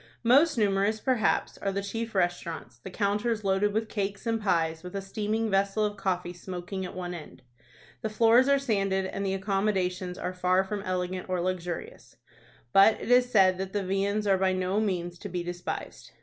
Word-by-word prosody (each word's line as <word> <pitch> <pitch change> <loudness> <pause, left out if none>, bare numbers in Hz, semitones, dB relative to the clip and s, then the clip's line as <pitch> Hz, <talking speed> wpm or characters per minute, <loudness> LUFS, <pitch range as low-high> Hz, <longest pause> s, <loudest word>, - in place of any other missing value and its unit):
Most 280 +6 +5
numerous, 205 0 +2
perhaps, 250 -3 0
are 195 - -1
the 200 +1 -2
chief 225 +2 -4
restaurants, 170 -9 -2
the 130 - -8
counters 210 +3 0
loaded 195 +1 +2
with 220 +2 -1
cakes 200 -1 -3
and 225 -1 0
pies, 165 -5 +1
with 180 +2 -9
a - - 0
steaming 215 +3 -2
vessel 200 +2 +2
of 205 0 -2
coffee 180 -3 -2
smoking 180 +2 -6
at 185 - -7
one 180 -1 -4
end. 160 -6 -10 0.6
The 220 - -2
floors 230 +4 +4
are 280 - +5
sanded, 195 -7 0
and 195 +1 -4
the 195 -1 0
accommodations 190 -2 -1
are 180 - -3
far 185 +1 +2
from 200 +1 -4
elegant 185 -1 -3
or 185 -1 0
luxurious; 180 -1 -4 0.6
but 200 +3 +6
it - - -4
is 250 0 +5
said 185 -4 +4
that 190 0 -4
the 205 -2 -1
viands 200 +2 0
are 195 -2 +3
by 190 -1 +2
no 185 +2 0
means 175 -5 -2
to 200 - -7
be 175 -1 -3
despised. 175 0 -6
195 Hz, 190 wpm, -28 LUFS, 180-210 Hz, 0.6 s, but